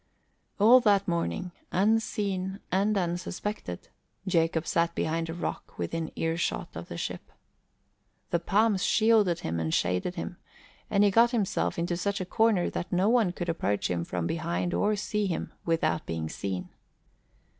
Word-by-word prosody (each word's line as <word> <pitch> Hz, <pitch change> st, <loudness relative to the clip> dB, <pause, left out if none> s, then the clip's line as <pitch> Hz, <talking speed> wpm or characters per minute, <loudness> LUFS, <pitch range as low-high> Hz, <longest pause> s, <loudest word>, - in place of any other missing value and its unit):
All 230 Hz, +5 st, +8 dB
that 205 Hz, -4 st, +3 dB
morning, 175 Hz, +1 st, -1 dB, 0.2 s
unseen 195 Hz, -2 st, 0 dB
and 200 Hz, +3 st, +2 dB
unsuspected, 175 Hz, -, -3 dB, 0.4 s
Jacob 165 Hz, -3 st, +1 dB
sat 170 Hz, 0 st, +1 dB
behind 165 Hz, +1 st, -1 dB
a -, -, -3 dB
rock 175 Hz, -, -5 dB
within 165 Hz, -1 st, -3 dB
earshot 165 Hz, +1 st, -1 dB
of -, -, -6 dB
the -, -, -7 dB
ship. -, -, -5 dB, 1.0 s
The 170 Hz, -, +2 dB
palms 205 Hz, +2 st, +2 dB
shielded 215 Hz, -6 st, +3 dB
him 85 Hz, +1 st, -2 dB
and 80 Hz, -1 st, -1 dB
shaded 90 Hz, -, 0 dB
him 175 Hz, 0 st, -5 dB, 0.5 s
and 200 Hz, 0 st, +3 dB
he 205 Hz, -, +5 dB
got 230 Hz, +4 st, +5 dB
himself 225 Hz, -6 st, 0 dB
into 170 Hz, 0 st, -1 dB
such 200 Hz, +3 st, -1 dB
a 185 Hz, -, -3 dB
corner 220 Hz, -1 st, +2 dB
that -, -, -4 dB
no 185 Hz, +4 st, +3 dB
one 230 Hz, -6 st, +3 dB
could 175 Hz, 0 st, -5 dB
approach 105 Hz, -, 0 dB
him 85 Hz, -1 st, -1 dB
from 90 Hz, -1 st, -3 dB
behind 170 Hz, -, -1 dB
or 210 Hz, +1 st, +2 dB
see 210 Hz, 0 st, -1 dB
him 170 Hz, -, -3 dB
without 160 Hz, -2 st, 0 dB
being 80 Hz, -1 st, -3 dB
seen. 95 Hz, 0 st, -4 dB
180 Hz, 155 wpm, -28 LUFS, 165-205 Hz, 1.0 s, All